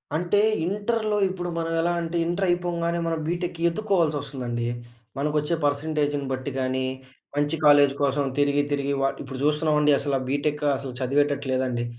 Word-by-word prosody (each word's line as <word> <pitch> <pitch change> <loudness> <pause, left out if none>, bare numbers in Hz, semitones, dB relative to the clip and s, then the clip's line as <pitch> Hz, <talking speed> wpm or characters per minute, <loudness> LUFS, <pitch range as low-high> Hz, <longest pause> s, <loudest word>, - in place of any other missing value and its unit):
అంటే 175 +5 +1 0.3
ఇంటర్‌లో, 210 +3 0
ఇప్పుడు 180 -1 -4
మనం 165 0 -2
ఎలా 175 +1 +1
అంటే, 170 +1 -3
ఇంటర్ 175 +3 0
అయిపోంగానే 170 -1 0
మనం 165 -1 -1
బీటెక్‌కి 175 0 -3
వెత్తుక్కోవాల్సి 170 -4 +1
వస్తుందండి. 125 -4 -4 0.5
మనకొచ్చే 150 +3 0
పర్సెంటేజ్‌ని 145 -1 0
బట్టి 130 +2 -4
గానీ, 130 0 0 0.5
మంచి 145 +2 +1
కాలేజ్ 145 -2 +6
కోసం 140 +1 +1 0.2
తిరిగి, 145 0 +3
తిరిగి 140 0 0
వ - - +1 0.2
ఇప్పుడు 135 -1 -7
చూస్తున్నామండి. 150 -1 +3
అసలు 140 -1 0
బీటెక్ 145 +2 -1
అసలు 130 -2 -7
చదివేటట్టు 140 +1 +1
లేదండి. 125 -2 -1
150 Hz, 145 wpm, -25 LUFS, 140-170 Hz, 0.5 s, కాలేజ్